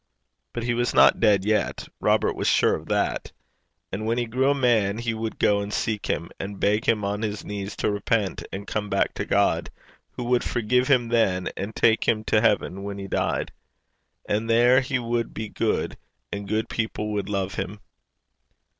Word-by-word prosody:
But 120 - -3
he 120 0 0
was 120 +1 0
not - - +6
dead 100 -2 +3
yet: 110 0 0
Robert - - +2
was - - -2
sure - - +4
of - - -9
that. - - -1 0.6
And 110 +3 -3
when 115 +1 +1
he 120 - 0
grew 130 +4 +1
a 140 - +3
man, 110 -6 +2
he 115 0 -2
would 110 0 -4
go 100 0 +3
and 100 0 -5
seek 105 -1 -2
him, 85 - -2
and 100 0 -6
beg 105 +4 +1
him 110 -5 +2
on 100 +1 -2
his 105 -2 -3
knees 100 0 -5
to - - 0
repent 105 -1 -1
and 100 +1 -6
come 105 -1 -3
back 100 - +1
to - - -4
God, - - +1 0.4
who - - -5
would 120 0 +1
forgive 125 +2 +1
him 125 -4 +3
then, 95 -6 +1
and 100 +3 -5
take 110 0 +3
him 110 -1 +2
to 110 0 +2
heaven 105 -3 +1
when 100 0 -5
he 100 0 -6
died. - - -1 0.8
And 110 +2 -1
there 120 +3 +5
he 135 0 -1
would 120 -1 -2
be 110 -1 -4
good, - - -1 0.3
and 100 -1 -5
good 110 +1 0
people 110 -1 -3
would 100 -1 -2
love 100 -1 -1
him. 100 +3 -4
110 Hz, 195 wpm, -25 LUFS, 100-120 Hz, 0.8 s, not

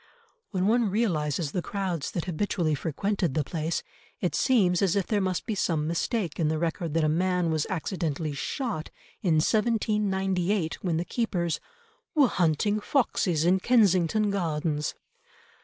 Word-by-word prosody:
When 185 -3 -1
one 225 +1 +3
realises 165 - 0
the 180 - -1
crowds 185 -6 -3
that 170 - -3
habitually 175 -2 0
frequented 170 +2 -1
the 155 - +2
place 160 +3 -2 0.4
it - - -1
seems 190 -9 +3
as 195 -2 +2
if 200 -2 +1
there 210 -2 0
must 185 -2 -1
be 225 - -2
some 165 -6 0
mistake 170 +2 -1
in 160 - +2
the 155 +1 0
record 165 -1 -2
that 165 - +3
a - - +3
man 180 +1 +1
was 155 -2 0
accidentally 165 -4 -2
shot 200 - -3 0.3
in 170 -5 +2
1798 195 -2 +1
when 170 -4 0
the 170 - -1
keepers 175 -6 -1 0.6
"were 290 -4 +6
hunting 185 +3 +1
foxes 200 - +1
in 185 +2 +4
Kensington 205 -2 +3
Gardens!" 155 -5 -1
180 Hz, 150 wpm, -27 LUFS, 160-205 Hz, 0.6 s, were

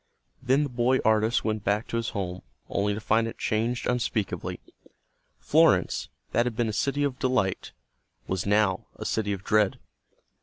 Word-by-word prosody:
Then 130 +3 +3
the 145 - -2
boy 125 +1 +2
artist 110 +2 +3
went 110 -2 -1
back 105 +2 0
to 115 - -1
his 115 0 -1
home, 90 -4 -4 0.3
only 100 +1 0
to - - -4
find 110 +2 +2
it 115 - -7
changed 115 +3 -1
unspeakably. 115 -4 -1 0.8
Florence, - - +3 0.2
that 120 +1 +2
had 120 - -3
been 115 -1 0
a - - -3
city 140 +5 0
of 140 -3 -1
delight, 115 -8 0 0.6
was 95 0 -2
now 105 -2 +2
a - - -7
city 105 -2 -1
of 95 -2 -4
dread. 105 -2 +2
110 Hz, 165 wpm, -27 LUFS, 105-125 Hz, 0.8 s, Then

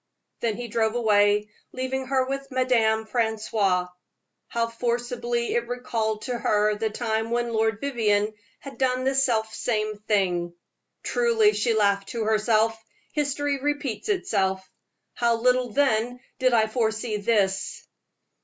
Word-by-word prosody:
Then 225 -3 -1
he 240 0 -5
drove 220 0 0
away, 210 -2 +3 0.2
leaving 260 +1 -3
her 260 -1 +2
with 275 +1 -4
Madame 235 -4 +2
Francoise. 215 -5 0 0.6
How 235 0 0
forcibly 240 0 -2
it 235 0 0
recalled 225 -3 -2
to 245 -2 -3
her 210 -1 +2
the 220 +1 -1
time 220 0 -2
when 235 0 -1
Lord 220 -1 +1
Vivianne 215 -6 +1 0.3
had 275 - -10
done 255 -1 +1
the 265 +1 +1
self 230 -5 +1
same 215 -3 -2
thing. 180 -5 0 0.5
"Truly," 455 -3 +3
she 235 -2 +1
laughed 200 -2 +2
to 230 -2 -2
herself, 220 +1 +2 0.3
"history 290 -1 -1
repeats 285 - -2
itself. 190 - 0 0.5
How 235 -1 +2
little 250 +1 +2
then 245 -1 +1 0.2
did 255 -1 +3
I 225 -2 +4
foresee 220 -1 -1
this." 200 -3 0
230 Hz, 135 wpm, -25 LUFS, 215-255 Hz, 0.6 s, I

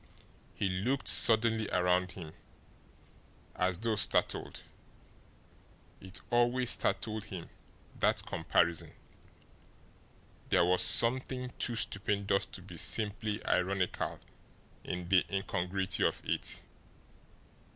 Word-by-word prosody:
He 100 - -1
looked 105 +9 -1
suddenly 110 -1 +3
around 90 0 +1
him, 80 -4 -9 1.2
as 90 -1 0
though 115 +3 -1
startled. - - 0 1.4
It 95 +1 -10
always 120 +1 +3
startled 110 -2 +1
him, 90 -4 -8 0.5
that - - +1
comparison. 85 0 0 1.6
There - - +4
was 90 +1 +3
something 125 +1 +3
too 120 - -1
stupendous 100 -2 -1
to - - -9
be - - -11
simply 105 0 -1
ironical 90 0 -1 0.6
in 90 -1 -5
the 90 0 +4
incongruity 95 -1 -2
of - - 0
it. - - -2
100 Hz, 95 wpm, -32 LUFS, 90-115 Hz, 1.6 s, There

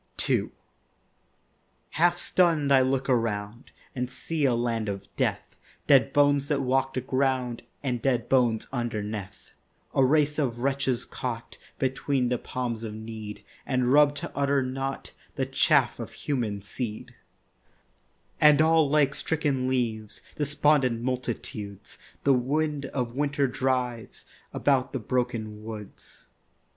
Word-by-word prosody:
II - - +1 1.4
Half 175 +2 +3
stun'd 165 -6 +2
I 135 -1 +7
look 130 +1 0
around 115 -2 -1 0.2
And 125 -1 -2
see 155 +2 -2
a 125 -3 +3
land 115 -2 -1
of 100 -1 -5
death— - - -2 0.3
Dead - - +5
bones 145 -1 +3
that 145 -2 0
walk 135 +1 +1
the 130 - 0
ground 130 -2 0 0.2
And 125 -4 -1
dead 125 -3 +1
bones 120 -4 +2
underneath; 105 -5 -4 0.4
A 135 - +4
race 150 +2 +3
of 125 -5 0
wretches 135 -1 0
caught 120 -3 -6 0.2
Between 130 -1 0
the 125 -1 0
palms 120 -3 -4
of 110 -1 -5
Need 110 -1 -8 0.2
And 130 -1 +1
rub'd 145 0 +5
to 170 +4 -6
utter 140 -1 +2
naught, 135 +1 -4 0.2
The - - 0
chaff - - +3
of - - -6
human 110 -8 -2
seed; 110 +1 -5 1.3
And 150 -1 +7
all 160 -2 +4
like 145 -2 +3
stricken 145 -6 0
leaves, 115 -5 -2
Despondent 145 -5 +2
multitudes 120 -5 -4 0.2
The 140 - +5
wind 145 +3 0
of 125 -3 -3
winter 145 0 +1
drives 125 -3 -2 0.3
About 135 -2 +1
the 135 - -1
broken 115 -3 -2
woods. 110 -2 -10
130 Hz, 130 wpm, -27 LUFS, 115-140 Hz, 1.4 s, I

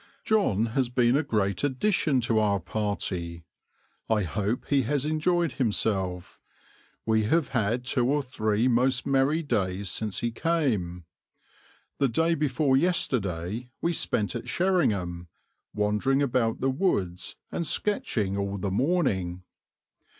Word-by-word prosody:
John 155 - +2
has 130 -2 +1
been 125 0 +3
a 145 - +3
great 105 - -1
addition 145 -1 +1
to 115 -1 +1
our 100 -2 +2
party. 90 -3 -3 0.6
I 110 -2 +2
hope 100 - -2
he 140 -1 +3
has 140 +3 0
enjoyed 160 +1 +1
himself; 100 -7 -1 0.7
we 110 -1 +2
have 155 +5 +2
had 120 0 0
two 125 -1 +1
or 145 +1 +1
three 110 -2 0
most 125 +1 +2
merry 140 +4 +2
days 95 - -1
since 105 -4 -3
he 120 - -1
came. 115 - -1 0.9
The 140 - +4
day 165 +7 +2
before 140 -3 +1
yesterday 120 - 0
we 170 - 0
spent 105 -9 -1
at 120 - -5
Sherringham, 100 - 0 0.4
wandering 105 +7 +1
about 120 -4 0
the 135 +1 +2
woods 95 - -1 0.2
and 170 - -2
sketching 110 - 0
all 100 0 -2
the 100 0 -2
morning. 95 - 0
120 Hz, 130 wpm, -27 LUFS, 100-140 Hz, 0.9 s, The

